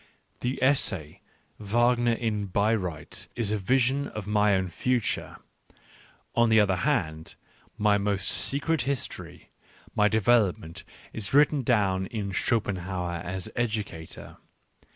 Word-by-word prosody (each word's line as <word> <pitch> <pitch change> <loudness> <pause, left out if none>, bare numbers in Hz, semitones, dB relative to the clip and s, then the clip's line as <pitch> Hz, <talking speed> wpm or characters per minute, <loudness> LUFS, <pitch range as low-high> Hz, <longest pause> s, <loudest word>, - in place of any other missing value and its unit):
The 125 +2 -2
essay 100 - +1 0.4
Wagner 120 +3 +2
in 110 -3 -2
Bayreuth 100 -4 -1
is 115 -4 -1
a 110 - +1
vision 130 +6 +1
of 105 -2 -7
my 105 -1 +3
own 95 -1 0
future; 125 +5 -1 1.0
on 120 -1 +3
the 110 0 +6
other 95 -3 +3
hand, 85 - -1 0.4
my 105 -1 +3
most 100 -1 -1
secret 150 +3 0
history, 95 - -4 0.4
my 105 - +4
develop 110 -2 +3
ment, 80 +1 -10 0.3
is 105 +3 -2
written 145 0 +5
down 100 -6 +1
in 105 -5 -4
Schopenhauer 95 -5 -1
as 90 0 -4
Educator. 105 -8 -4
105 Hz, 120 wpm, -27 LUFS, 95-120 Hz, 1.0 s, the